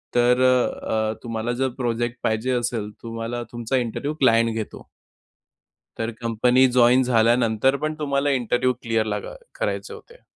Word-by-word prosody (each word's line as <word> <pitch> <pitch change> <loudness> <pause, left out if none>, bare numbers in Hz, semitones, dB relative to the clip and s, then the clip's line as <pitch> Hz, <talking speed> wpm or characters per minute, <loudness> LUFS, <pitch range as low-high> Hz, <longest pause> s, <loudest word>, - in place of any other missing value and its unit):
तर 125 +1 +4
अ, 120 -3 +1
अ, - - -4
तुम्हाला 115 0 -3
जर 135 - +3
प्रोजेक्ट 120 -1 -2
पाहिजे 110 +3 0
असेल, 120 -3 -2
तुम्हाला 115 +1 -4
तुमचा 120 +2 -1
इंटरव्ह्यू 125 +5 -2
क्लायंट 115 -3 +4
घेतो 110 -2 -6 1.1
तर 115 +1 -2
कंपनी 125 +3 +3
जॉइन 125 +1 +6
झाल्यानंतर 120 +1 +2
पण 155 +2 -3
तुम्हाला 140 -1 0
इंटरव्ह्यू 125 -1 +1
क्लिअर 115 -1 0
लागा 105 - -4 0.2
करायचे - - -3
होते. 480 +1 -15
120 Hz, 140 wpm, -23 LUFS, 115-130 Hz, 1.1 s, जॉइन